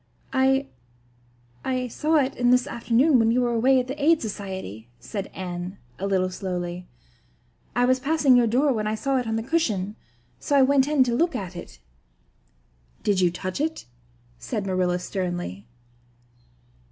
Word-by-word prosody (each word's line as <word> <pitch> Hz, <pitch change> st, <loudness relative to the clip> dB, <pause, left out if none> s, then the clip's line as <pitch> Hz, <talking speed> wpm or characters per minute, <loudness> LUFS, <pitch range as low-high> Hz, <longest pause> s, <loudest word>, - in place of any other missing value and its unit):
"I 270 Hz, +1 st, +3 dB, 1.0 s
I 255 Hz, -1 st, -1 dB
saw 310 Hz, +7 st, 0 dB
it 275 Hz, -3 st, +2 dB
this 245 Hz, +1 st, +3 dB
afternoon 250 Hz, +2 st, +2 dB
when 225 Hz, 0 st, +3 dB
you 245 Hz, +2 st, +2 dB
were 240 Hz, -1 st, +1 dB
away 255 Hz, +3 st, +4 dB
at 250 Hz, -, -1 dB
the 275 Hz, +3 st, -5 dB
Aid 325 Hz, +1 st, +5 dB
Society," 190 Hz, -, -6 dB
said 160 Hz, -, -5 dB
Anne, 180 Hz, 0 st, -6 dB, 0.2 s
a 195 Hz, -, -2 dB
little 185 Hz, -2 st, +1 dB
slowly. 180 Hz, -1 st, -4 dB, 0.9 s
"I 245 Hz, +1 st, +3 dB
was 255 Hz, +1 st, +3 dB
passing 280 Hz, -1 st, +3 dB
your 240 Hz, -1 st, +4 dB
door 265 Hz, +5 st, +2 dB
when 215 Hz, -2 st, -2 dB
I 215 Hz, -, 0 dB
saw 270 Hz, +4 st, 0 dB
it 245 Hz, -, -4 dB
on 225 Hz, -, -1 dB
the 225 Hz, -, -2 dB
cushion, 215 Hz, -, -1 dB, 0.4 s
so 285 Hz, -, 0 dB
I 270 Hz, -, +6 dB
went 275 Hz, 0 st, +4 dB
in 295 Hz, -3 st, +4 dB
to 245 Hz, -2 st, -1 dB
look 330 Hz, +4 st, +1 dB
at 190 Hz, -5 st, -5 dB
it." 175 Hz, -, -9 dB, 1.3 s
"Did 200 Hz, -3 st, +2 dB
you 180 Hz, -, +4 dB
touch 185 Hz, +6 st, -4 dB
it?" 320 Hz, +1 st, -2 dB, 0.5 s
said 215 Hz, -5 st, -4 dB
Marilla 185 Hz, -2 st, +1 dB
sternly. 175 Hz, -, -4 dB
230 Hz, 165 wpm, -25 LUFS, 185-265 Hz, 1.3 s, I